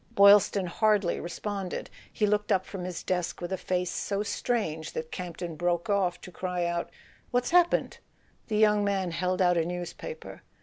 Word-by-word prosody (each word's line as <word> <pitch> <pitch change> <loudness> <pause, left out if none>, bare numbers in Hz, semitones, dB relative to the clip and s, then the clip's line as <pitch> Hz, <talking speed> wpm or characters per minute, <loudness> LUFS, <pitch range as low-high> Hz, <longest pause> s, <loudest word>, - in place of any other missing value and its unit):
Boylston 200 -1 +6
hardly 205 0 +2
responded: 195 +1 -4 0.2
he 210 - +1
looked 210 0 +1
up 185 - +2
from 185 -3 -6
his 180 -1 -5
desk 180 -2 -1
with 175 +1 -4
a - - +2
face 180 -1 -1
so 200 0 -2
strange 185 -8 -2
that 160 0 -5
Campton 175 -2 -5
broke 175 +4 0
off 185 -3 +1
to 180 - -10
cry 180 -1 -2
out: 170 0 -2 0.4
"What's 245 +2 0
happened?' 350 0 +3 0.5
The 215 - -1
young 210 -1 +4
man 195 -3 0
held 185 +2 0
out 180 -1 +4
a 165 - +3
newspaper. 175 - -6
185 Hz, 170 wpm, -28 LUFS, 175-205 Hz, 0.5 s, Boylston